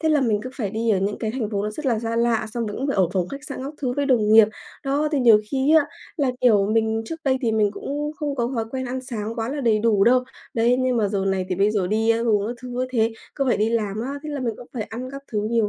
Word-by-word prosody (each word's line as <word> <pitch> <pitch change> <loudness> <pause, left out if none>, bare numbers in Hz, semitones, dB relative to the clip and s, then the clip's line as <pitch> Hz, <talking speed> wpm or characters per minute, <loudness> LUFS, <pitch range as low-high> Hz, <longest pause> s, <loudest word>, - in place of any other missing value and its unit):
thế 320 - +1
là 305 -2 +3
mình 220 -5 +1
cứ 255 - -6
phải 215 -8 -3
đi 225 +2 0
ở 195 - +3
những 200 +2 -1
cái 220 - -2
thành 225 -3 -3
phố 200 -2 -1
nó 210 - -2
rất 280 +7 -6
là 235 -4 +2
xa 230 +1 -3
lạ, 235 -2 +1
xong 235 -2 -2
mình 205 - -5
cũng 270 - -2
phải 275 - -1
ở 185 -3 +3
phòng 180 -2 0
khách 280 +1 -8
sạn 280 - -6
các 285 +3 -6
thứ 250 -2 0
với 285 -1 +1
đồng 220 -5 +3
nghiệp. 220 -1 +8 0.4
Đó, 285 +3 +1
thì 285 - +2
nhiều 225 -4 +6
khi 275 +3 +2
á, 300 -2 +4 0.3
là, 280 -4 +1
kiểu, 210 -5 +4
mình 225 0 +1
trước 325 +7 -6
đây 260 -1 +2
thì 230 -3 0
mình 210 -2 +2
cũng 295 +7 -4
không 290 -1 -2
có 240 -2 -1
thói 225 -2 -1
quen 260 0 -3
ăn 260 +1 -3
sáng 225 -4 -5
quá 225 -1 -3
là 285 +2 -3
đầy 225 -4 +3
đủ 210 -3 +3
đâu. 250 +1 +4 0.3
Đấy, 235 +2 +3
nhưng 255 -1 +1
mà 210 -3 +2
giờ 195 -1 -1
này 190 -1 0
thì 185 - 0
bây 200 +3 +2
giờ 205 -4 0
đi 220 +3 +1
ăn 230 +1 +1
uống 210 -2 +2
các 240 - -3
thứ 250 - -7
như 250 +1 -2
thế 225 -2 +1 0.2
cứ 275 - 0
phải - - +3
đi 215 +2 +1
làm 215 -2 -1
á, 250 +4 -3
thế 305 - -6
là 285 -2 -3
mình 235 -3 -1
cũng 245 - -11
phải 240 - -3
ăn 235 +4 -6
các 275 0 -8
thứ 215 - 0
nhiều 230 -3 +2
230 Hz, 315 wpm, -23 LUFS, 215-260 Hz, 0.4 s, nghiệp